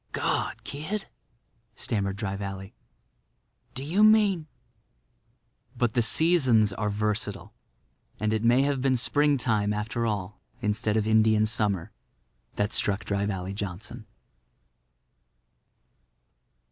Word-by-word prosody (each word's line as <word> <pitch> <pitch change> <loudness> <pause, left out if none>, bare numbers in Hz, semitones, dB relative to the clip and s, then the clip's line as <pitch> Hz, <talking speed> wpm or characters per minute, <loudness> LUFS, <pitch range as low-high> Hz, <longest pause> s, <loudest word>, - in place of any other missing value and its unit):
"God, - - -1
kid!" 190 +9 -4 0.7
stammered 100 -4 -1
Dry 100 -2 -3
Valley, 95 -1 -6 1.0
"do 130 - -3
you 180 +9 +2
mean—?" 205 -7 +4 1.3
But 120 -2 +1
the 120 - +2
seasons 125 - +3
are 105 +1 -2
versatile; 105 -1 -2 0.7
and 110 +1 0
it 110 0 -1
may 120 +3 +4
have 140 -2 0
been 130 -1 +2
Springtime, 120 -6 +1
after 110 +3 -2
all, 100 -2 -4 0.2
instead 105 -1 0
of 105 - +1
Indian 110 0 +4
Summer, 105 -5 -1 0.6
that 105 +1 -1
struck 100 +1 +1
Dry 100 0 -1
Valley 95 -1 -4
Johnson. 100 -2 -6
110 Hz, 110 wpm, -27 LUFS, 100-130 Hz, 1.3 s, mean